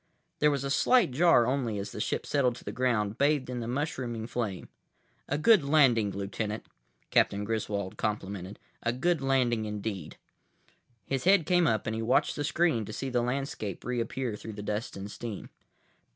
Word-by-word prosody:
There 150 - +5
was 140 -2 -1
a 140 - -2
slight 230 - +4
jar 150 -3 +5
only 125 -4 -1
as 100 0 -4
the 105 - -5
ship - - -2
settled 130 -4 +1
to - - -12
the - - -5
ground, 115 -4 0
bathed 140 -2 +2
in 125 - -3
the 115 - -4
mushrooming 125 -4 -3
flame. 110 -6 -3 0.6
"A 145 - +1
good 205 +2 +5
landing, 135 -8 +4
Lieutenant," 100 +2 -4 0.5
Captain 100 +1 +3
Griswold 105 -3 -3
complimented. 100 -2 -3 0.2
"A 120 - 0
good 165 +5 +1
landing, 125 -5 +1
indeed." 105 -5 -5 0.9
His 135 +1 -2
head 190 -3 +5
came 175 -1 +3
up 110 -4 +1
and 110 - -2
he 110 - -2
watched 120 +4 +2
the 145 - -2
screen 155 -6 +1
to 110 - -8
see 135 +3 -4
the 120 -1 +2
landscape 125 -5 -3
reappear 120 -1 -2
through 110 +1 -8
the 105 - -7
dust 105 +1 -3
and 100 +1 -6
steam. 110 -4 -7
120 Hz, 180 wpm, -29 LUFS, 105-140 Hz, 0.9 s, There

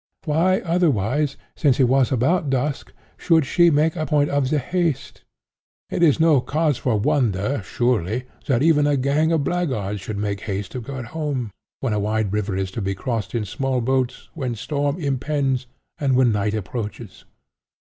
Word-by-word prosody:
Why, 170 +5 +2
otherwise, 150 - +1 0.2
since 140 -5 +2
it - - +6
was 130 0 +3
about 140 +6 +1
dusk, 135 +2 -1 0.3
should 160 -4 +3
she 170 +4 +4
make 155 +2 +2
a 155 -3 -2
point 150 -2 +2
of 140 -2 +1
the 155 - +2
haste? 165 +1 -2 0.7
It - - -1
is 165 -3 +4
no 160 -5 +5
cause 150 0 0
for 115 -5 0
wonder, 115 +1 +1
surely, 120 +1 0 0.2
that 130 -1 +2
even 150 -2 +4
a 145 -1 +2
gang 145 +5 +2
of 160 -3 +2
blackguards 120 - -2
should 105 +1 -5
make 100 -1 -2
haste 100 -2 -4
to 125 - -5
get 130 +1 -6
home, 145 -8 -2 0.3
when 130 -5 0
a 105 - 0
wide 105 -1 -1
river 105 -2 -1
is 95 -1 -2
to 110 - -4
be 95 0 -2
crossed 110 -3 -3
in 110 -3 -1
small 135 +5 -1
boats, 130 +1 -1
when 130 -6 -3
storm 145 +5 -2
impends, 135 -3 -1 0.3
and 135 -3 +2
when 125 -2 +4
night 105 0 0
approaches. 105 0 -6
130 Hz, 175 wpm, -22 LUFS, 110-150 Hz, 0.7 s, it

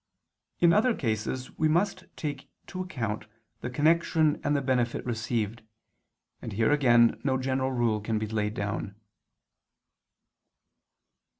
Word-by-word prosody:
In 170 -1 +5
other 225 +3 +3
cases 115 +2 -3
we 155 - +4
must 185 +4 +1
take 145 -3 -5 0.2
to 185 - -6
account 115 - -4 0.3
the 125 - -4
connection 155 +2 +2
and 145 -1 +1
the 140 - +1
benefit 125 -2 0
received; 115 -1 -2 0.8
and 110 - -6
here 110 +5 +2
again 120 -6 +4
no 135 -1 +1
general 130 0 -1
rule 120 -4 +1
can 110 +1 -1
laid 105 0 -2
down. 100 0 -3
125 Hz, 120 wpm, -28 LUFS, 110-150 Hz, 0.8 s, In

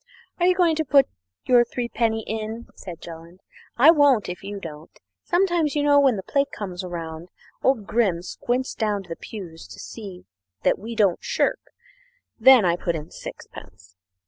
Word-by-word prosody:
"Are 350 - +3
you 365 - +4
going 345 -3 +3
to 315 - +1
put 275 -2 +4 0.4
your 245 -1 +5
threepenny 230 -2 -2
bit - - -3
in?" 225 +2 -6
said 175 -3 -10
Jolland; 170 +2 -11 0.4
"I 285 +7 +8
won't 285 - +3
if 180 0 -6
you 200 0 -6
don't. 155 -3 -9 0.3
Sometimes, 345 -5 +1
you 295 - +1
know, 290 0 +5
when 270 -4 +4
the 190 - -5
plate 280 +5 0
comes 185 -3 -6
round, 165 -1 -6 0.3
old 255 -6 +1
Grim 195 -7 +1
squints 250 +7 -2
down 210 -3 -1
the 165 - -5
pews 175 -7 -9
to - - -12
see 195 -5 -9 0.5
we 225 +3 -8
don't 200 -5 +2
shirk. 485 0 0 0.8
Then 250 -2 +7
I 170 0 +2
put 170 -1 -2
in 155 -1 -7
sixpence. 90 -1 -11
215 Hz, 170 wpm, -24 LUFS, 175-265 Hz, 0.8 s, I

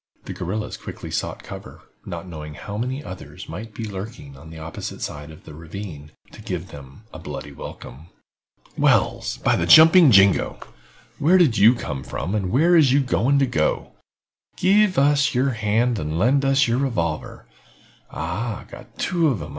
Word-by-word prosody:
The - - -6
guerrillas 105 +5 -4
quickly - - -9
sought - - -3
cover, - - -10 0.3
not 95 - -6
knowing 75 -3 -8
how 100 - -8
many 130 +6 -3
others 95 - -10
might 105 +7 -8
be 115 - -5
lurking 95 - -8
on 75 +4 -13
the 80 - -11
opposite 80 0 -7
side 75 0 -6
of 80 - -14
the - - -12
ravine 80 -1 -9 0.2
to - - -13
give - - -5
them 70 +6 -13
a - - -8
bloody 75 - -7
welcome. 70 +2 -10 0.7
"Wells, - - +1
by - - +1
the - - -1
jumping 160 0 +8
jingo! 100 -3 +4 0.6
Where 175 +6 +4
did 145 - +3
you 110 +5 +7
come 75 - -5
from 90 - -4
and 100 -4 -1
where 160 - +3
is 150 -6 +5
you 140 - +4
going 135 +1 +1
to? 80 -10 0 0.7
Give 195 +1 +3
us 140 -1 +3
yer 130 +3 +2
hand 110 +1 0
and 75 0 -3
lend 135 +8 +2
us 135 0 +3
yer 115 +1 +1
revolver. 85 - -3 0.6
Ah, 105 +7 -4
got - - -13
two 170 -3 +1
of 130 -9 0
'em. 75 - -7
105 Hz, 170 wpm, -22 LUFS, 80-135 Hz, 0.7 s, jumping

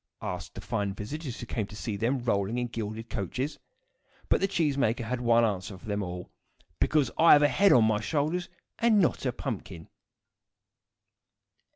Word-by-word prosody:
asked 90 -1 -5
the 95 - -6
fine 100 -1 -2
visitors 130 +5 -6
who - - -6
came 110 -3 -3
to 105 - -11
see 105 0 -4
them, 120 +5 0
rolling 100 0 0
in 125 - 0
gilded 115 -1 -5
coaches. 125 - -3 0.7
But - - +3
the 195 - +3
cheese 160 -7 +1
maker 120 -3 +1
had 125 +2 -3
one 115 -1 +4
answer 100 -2 -3
for 95 - -16
them 105 -1 -2
all: 90 -1 -6 0.5
"Because 150 -3 +2
I 165 - +8
have 145 - +6
a - - +7
head 195 +9 +4
on 120 - +6
my 110 -1 +1
shoulders, 155 - -1 0.3
and 230 -3 +4
not 165 -6 +1
a - - +1
pumpkin." 100 - -6
115 Hz, 180 wpm, -28 LUFS, 105-140 Hz, 0.7 s, I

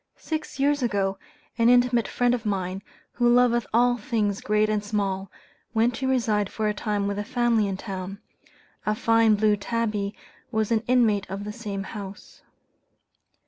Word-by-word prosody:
Six 310 -3 -5
years 285 +1 +2
ago, 195 -5 0 0.4
an 230 +1 +5
intimate 245 -1 +4
friend 245 0 +1
of 240 -3 -2
mine, 190 -3 -2 0.3
who 240 -1 +2
"loveth 240 -1 +3
all 245 +2 +3
things 210 -3 -1
great 210 +1 +2
and 215 -1 0
small," 200 -2 -2 0.5
went 230 +2 +3
to 265 - -2
reside 220 -6 +1
for 215 -1 -1
a 210 - +1
time 205 0 -2
with 200 0 -2
a - - -1
family 230 -1 +1
in 195 -1 -3
town. 195 -1 -6 0.6
A 215 - 0
fine 225 0 +4
blue 210 0 +3
tabby 210 -1 -2 0.4
was 220 0 0
an 225 -1 +3
inmate 225 -6 +2
of 195 +1 -5
the 210 0 -5
same 205 -3 -5
house. 200 0 -9
215 Hz, 165 wpm, -25 LUFS, 200-240 Hz, 0.6 s, an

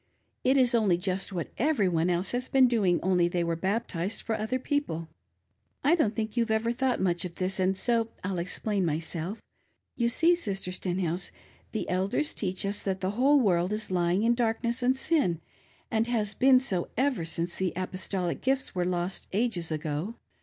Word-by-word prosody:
It 265 +2 +4
i^ 250 -2 +4
only 210 -7 +3
just 190 +2 -2
what 175 -4 -4
every 255 -7 +2
one 170 0 +1
else 180 +2 0
ha,s 250 +1 -1
been 265 -1 +5
doing, 200 -8 +2
only 180 -1 +3
they 175 0 0
were 170 0 0
baptized 190 +1 -2
fpr 220 -1 -1
other 220 +4 -1
people. 250 - -2 0.7
I 290 +4 +4
don't 280 -11 +2
think 220 -1 -3
you've 235 -2 +1
ever 220 +1 +1
thought 255 +1 0
much 175 -2 0
of 180 -2 -6
thi^, 185 - -1
^nd 190 0 +1
so 230 +3 +1 0.2
I'll 185 -1 -2
explain 195 +3 -1
myself. 165 +4 -3 0.5
You 235 -1 +1
see, 325 +8 +4
Sistes 195 - -3
Stenhouse, 180 -1 -1 0.4
the 220 - -3
Elders 190 +11 0
teach 190 -1 -2
us 200 +1 -1
that 190 -1 -2
the 185 +1 0
whole 270 +7 +4
world 180 -5 +2
is 215 -2 -3
lying 175 +1 +2
jn 230 +2 +4
^rlcnes^ 235 +1 0
s^d 265 - -2
pin, 185 - +2 0.5
and 225 0 +1
has 215 -4 0
been 260 +1 +5
so, 195 -9 -1
ever 260 -8 +1
since 170 +1 -2
the 185 -2 0
apostoliq 185 -1 -3
gifts 265 +1 0
were 180 -1 0
Ip^t 180 +1 -1
^ges 190 -6 0
ago. 155 +7 -3
195 Hz, 185 wpm, -28 LUFS, 180-235 Hz, 0.7 s, been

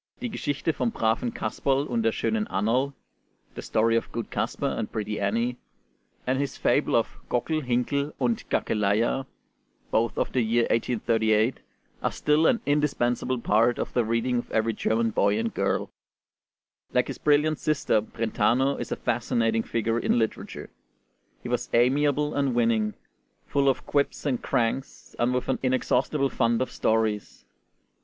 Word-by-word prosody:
'Die 245 - -3
Geschichte 155 -6 -2
vom 125 -4 0
braven 115 +2 0
Casperl 135 +6 -1
und 230 +8 -1
der 225 0 +2
schönen 220 -1 -1
Annerl' 125 +8 0 0.6
(The - - -7
Story 115 +1 +2
of 115 - -1
Good 115 0 -5
Casper - - -2
and - - -3
Pretty 105 -1 -3
Annie) 115 +5 0 0.7
and 130 +1 0
his 140 -2 -2
fable - - +2
of - - 0
'Gockel, 155 +6 0
Hinkel, 140 +3 0
und 120 -4 -1
Gackeleia,' 110 +5 +1 0.6
both 115 +1 +1
of - - -1
the 130 - +2
year 115 +1 +2
1838, 110 0 +1 0.4
are - - 0
still 150 +2 +2
an 235 - +2
indispensable 135 -4 +1
part 115 +2 +3
of - - -4
the 120 - +2
reading 115 +2 0
of - - -7
every 110 +1 +1
German 115 +1 0
boy 100 0 +2
and 115 0 -2
girl. - - 0 1.0
Like - - +2
his - - -7
brilliant 150 +1 +2
sister, 145 -7 +1
Brentano 120 +5 0
is - - -5
a - - +1
fascinating 115 -1 0
figure 115 0 -1
in - - +1
literature. 110 -2 -3 0.7
He - - -5
was - - -2
amiable 145 +4 +2
and 140 -3 0
winning, 115 -3 +1 0.5
full 140 -1 +2
of 130 - -1
quips 145 +1 0
and 130 -4 0
cranks, 120 +3 -2
and 120 +1 +2
with 125 0 -1
an 130 - 0
inexhaustible 135 +2 +1
fund 115 -2 +1
of 130 - -2
stories. 110 -2 -1
120 Hz, 155 wpm, -26 LUFS, 115-140 Hz, 1.0 s, part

